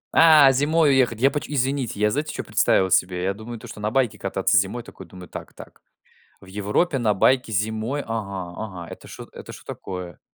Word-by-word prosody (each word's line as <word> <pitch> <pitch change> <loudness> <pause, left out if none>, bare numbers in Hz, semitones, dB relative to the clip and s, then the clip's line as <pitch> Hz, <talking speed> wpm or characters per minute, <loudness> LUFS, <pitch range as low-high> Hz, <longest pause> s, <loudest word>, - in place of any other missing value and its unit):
А, 155 -4 +8
зимой 145 +3 +3
уехать! 125 -4 +2
Я 135 - +5
почем 150 0 -4
Извините, 130 -4 -1
я 105 0 +2
знаете 150 +6 -2
чё - - -4
представил 95 0 +2
себе? 90 0 +2
Я 95 - 0
думаю 110 +3 -8
то, - - -12
что - - -10
на 105 0 -1
байке 130 -2 0
кататься 95 +2 0
зимой, 100 +6 0
такой 95 -5 -12
думаю: 90 +1 -12
"Так-так. - - -11 0.6
В 95 - -16
Европе 105 - 0
на 110 -3 +1
байке 125 +5 +2
зимой. 110 +6 -1
Ага-ага, 100 -4 -5
это - - -11
что - - -10
это - - -10
что - - -12
такое?" 90 -3 -7
110 Hz, 190 wpm, -23 LUFS, 95-135 Hz, 0.6 s, А